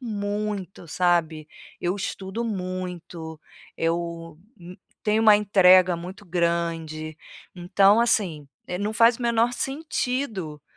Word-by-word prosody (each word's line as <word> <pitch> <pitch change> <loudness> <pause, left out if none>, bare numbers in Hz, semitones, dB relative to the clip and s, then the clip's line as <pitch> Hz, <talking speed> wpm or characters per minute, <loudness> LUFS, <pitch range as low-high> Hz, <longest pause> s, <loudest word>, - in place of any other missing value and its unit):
muito, 205 -5 -4
sabe. 165 -2 0 0.3
Eu 175 +1 -1
estudo 195 +2 -4
muito, 180 -5 -5 0.4
eu, 165 -1 -3 0.2
hum, 180 +1 -11 0.3
tenho 215 +1 +2
uma 215 -2 +7
entrega 185 -3 +5
muito 185 +4 -9
grande, 165 -2 -2 0.4
então 195 +4 +4
assim, 175 -11 0 0.2
eh, 180 - -4
não 210 +2 -2
faz 230 +2 +4
o - - -7
menor 235 0 +2
sentido, 250 - -3
185 Hz, 110 wpm, -24 LUFS, 170-210 Hz, 0.4 s, uma